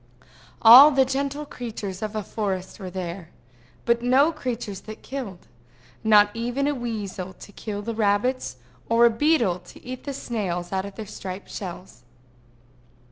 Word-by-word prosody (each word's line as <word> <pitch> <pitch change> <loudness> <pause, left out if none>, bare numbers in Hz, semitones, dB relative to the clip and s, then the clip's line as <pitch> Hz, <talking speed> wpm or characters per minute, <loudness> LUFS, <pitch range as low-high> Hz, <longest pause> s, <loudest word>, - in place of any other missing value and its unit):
All 250 +6 +11
the 270 -3 +3
gentle 280 +2 -2
creatures 215 -8 -6
of 215 0 -4
a 215 - -2
forest 190 -2 -4
were 190 -2 -6
there, 175 -2 -6 0.6
but 235 0 +2
no 265 +6 +4
creatures 240 - -5
that 215 - -9
killed, 240 -10 -6 0.6
not 210 -1 +6
even 245 +4 -1
a 290 - +1
weasel 210 -7 -5
to 205 - -13
kill 205 0 -6
the 230 +2 -3
rabbits, 215 - 0 0.3
or 230 +1 +5
a 235 - +5
beetle 230 - +2
to 175 - -16
eat 255 0 -7
the 280 - -3
snails 185 -9 -3
out 190 0 -1
of 200 -1 -9
their 220 - -6
striped 190 -1 -8
shells. 180 - -8
220 Hz, 155 wpm, -24 LUFS, 190-250 Hz, 0.6 s, All